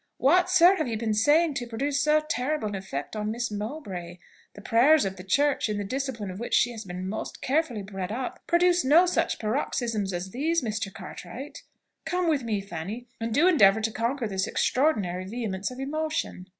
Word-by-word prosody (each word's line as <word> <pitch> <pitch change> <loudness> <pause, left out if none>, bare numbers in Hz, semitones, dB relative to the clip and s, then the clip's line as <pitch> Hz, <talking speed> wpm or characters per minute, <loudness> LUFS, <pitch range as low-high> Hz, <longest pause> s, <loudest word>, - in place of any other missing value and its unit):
What, 355 +7 +4
sir, 370 +1 +6
have 310 - -1
you 225 -2 -2
been 220 -1 -1
saying 295 +9 +3
to 245 -2 -4
produce 275 +5 -1
so 305 +1 +3
terrible 295 -3 -1
an - - -6
effect 190 -4 -5
on 210 0 -2
Miss 235 +1 -2
Mowbray? 205 - -6 0.4
The 205 - -10
prayers 255 +7 +4
of 190 0 -3
the 180 - -10
church, 280 +6 +1
in 210 - -1
the 205 - -2
discipline 235 -3 -3
of 185 - -8
which 235 - -1
she 245 - +3
has 225 -2 -7
been 180 0 -5
most 215 +3 -5
carefully 265 -6 0
bred 195 -1 -5
up, 250 +3 -4
produce 350 0 +3
no 310 +7 +6
such 340 -2 0
paroxysms 220 -3 -1
as 180 +1 -4
these, 320 - 0
Mr. 215 -3 -3
Cartwright. 210 - -9 0.4
Come 355 +2 -1
with 305 -4 +2
me, 220 -4 -2
Fanny, 200 +6 -7
and 230 0 -3
do 295 +10 +4
endeavour 220 - +5
to 220 +1 0
conquer 235 +3 -1
this 190 -2 -1
extraordinary 200 - +1
vehemence 200 -2 -3
of 255 0 -9
emotion." 305 -9 -3
235 Hz, 195 wpm, -27 LUFS, 200-295 Hz, 0.4 s, sir